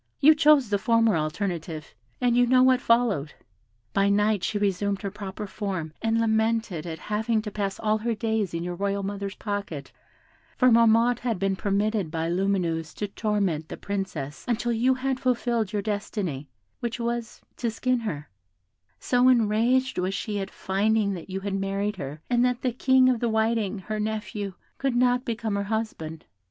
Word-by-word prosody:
You 300 Hz, +2 st, +8 dB
chose 300 Hz, -6 st, +4 dB
the 205 Hz, -, +2 dB
former 230 Hz, -1 st, +3 dB
alternative, 160 Hz, -1 st, -3 dB, 0.3 s
and 245 Hz, -1 st, +2 dB
you 245 Hz, 0 st, +4 dB
know 255 Hz, +1 st, +5 dB
what 255 Hz, -1 st, +4 dB
followed. 225 Hz, -, +2 dB, 0.6 s
By 195 Hz, 0 st, +3 dB
night 205 Hz, -1 st, +2 dB
she 210 Hz, -, 0 dB
resumed 200 Hz, 0 st, 0 dB
her 200 Hz, -, -3 dB
proper 205 Hz, 0 st, -6 dB
form, 190 Hz, -6 st, -4 dB
and 225 Hz, 0 st, +1 dB
lamented 220 Hz, -6 st, 0 dB
at 160 Hz, -1 st, -5 dB
having 220 Hz, +3 st, -1 dB
to 210 Hz, -, -5 dB
pass 200 Hz, -1 st, -3 dB
all 215 Hz, 0 st, +1 dB
her 230 Hz, +1 st, -1 dB
days 220 Hz, -5 st, -1 dB
in 165 Hz, -, -2 dB
your 175 Hz, 0 st, -3 dB
royal 200 Hz, +2 st, -1 dB
mother's 200 Hz, 0 st, -4 dB
pocket, 200 Hz, -9 st, -5 dB, 0.7 s
for 255 Hz, -1 st, +5 dB
Marmotte 230 Hz, +1 st, +5 dB
had 235 Hz, -4 st, -1 dB
been 195 Hz, +1 st, 0 dB
permitted 200 Hz, -1 st, 0 dB
by 165 Hz, +1 st, -2 dB
Lumineuse 175 Hz, -4 st, 0 dB
to 205 Hz, -, -3 dB
torment 195 Hz, -8 st, -1 dB
the -, -, -6 dB
Princess 185 Hz, -8 st, -4 dB
until 240 Hz, 0 st, 0 dB
you 245 Hz, +3 st, +2 dB
had 260 Hz, 0 st, -1 dB
fulfilled 235 Hz, -4 st, 0 dB
your 205 Hz, -2 st, -1 dB
destiny, 200 Hz, -, -3 dB, 0.3 s
which 235 Hz, +1 st, -3 dB
was, 235 Hz, -1 st, -3 dB, 0.2 s
to 235 Hz, -, -1 dB
skin 250 Hz, +3 st, 0 dB
her; 150 Hz, -10 st, -4 dB, 0.7 s
so 250 Hz, 0 st, +3 dB
enraged 240 Hz, +2 st, +2 dB
was 185 Hz, +2 st, -1 dB
she 205 Hz, 0 st, -3 dB
at 195 Hz, 0 st, -4 dB
finding 200 Hz, +1 st, +1 dB
that 180 Hz, 0 st, -8 dB
you 190 Hz, +1 st, -4 dB
had 200 Hz, 0 st, -3 dB
married 195 Hz, +1 st, -1 dB
her, 145 Hz, -1 st, -6 dB
and 240 Hz, -1 st, +2 dB
that 250 Hz, 0 st, 0 dB
the 255 Hz, -, +1 dB
King 260 Hz, +1 st, +4 dB
of 250 Hz, -2 st, +2 dB
the 235 Hz, -, 0 dB
Whiting, 220 Hz, -2 st, +1 dB
her 215 Hz, +3 st, -4 dB
nephew, 210 Hz, -2 st, -3 dB, 0.2 s
could 270 Hz, -3 st, 0 dB
not 250 Hz, +1 st, +3 dB
become 230 Hz, -3 st, -2 dB
her 200 Hz, 0 st, -1 dB
husband. 200 Hz, -8 st, -4 dB
210 Hz, 175 wpm, -26 LUFS, 195-235 Hz, 0.7 s, You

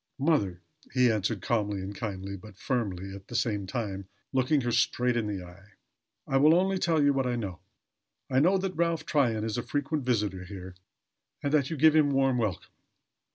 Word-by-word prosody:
"Mother," 130 Hz, -, +1 dB, 0.3 s
he 125 Hz, -2 st, +5 dB
answered, 105 Hz, -1 st, -1 dB
calmly 105 Hz, -4 st, 0 dB
and 95 Hz, +2 st, -5 dB
kindly, 100 Hz, -2 st, -5 dB
but 100 Hz, +1 st, -13 dB
firmly, 100 Hz, -7 st, -2 dB
at 100 Hz, 0 st, -11 dB
the 120 Hz, -, -8 dB
same 105 Hz, -5 st, 0 dB
time 100 Hz, -3 st, -4 dB, 0.3 s
looking 135 Hz, +3 st, +2 dB
her 120 Hz, -1 st, -1 dB
straight 120 Hz, +1 st, +2 dB
in 115 Hz, -3 st, 0 dB
the 100 Hz, -3 st, -4 dB
eye. 95 Hz, +4 st, -16 dB, 0.5 s
"I 135 Hz, -, +1 dB
will 150 Hz, +4 st, +6 dB
only 190 Hz, +1 st, +2 dB
tell 165 Hz, -5 st, +2 dB
you 145 Hz, 0 st, +4 dB
what 135 Hz, -2 st, 0 dB
I 125 Hz, -, 0 dB
know. 100 Hz, -7 st, -4 dB, 0.7 s
I 130 Hz, -, +2 dB
know 180 Hz, +7 st, +4 dB
that 190 Hz, 0 st, -2 dB
Ralph 170 Hz, -2 st, 0 dB
Tryon 120 Hz, -7 st, +1 dB
is 110 Hz, +1 st, -2 dB
a -, -, 0 dB
frequent 145 Hz, +3 st, -2 dB
visitor 105 Hz, -7 st, 0 dB
here 95 Hz, -1 st, -8 dB, 0.7 s
and 145 Hz, -, -1 dB
that 140 Hz, -3 st, +3 dB
you 160 Hz, -, -3 dB
give 155 Hz, +2 st, +5 dB
him 150 Hz, -2 st, +5 dB
warm 135 Hz, -2 st, +2 dB
welcome. 105 Hz, -6 st, -2 dB
120 Hz, 195 wpm, -28 LUFS, 100-145 Hz, 0.7 s, will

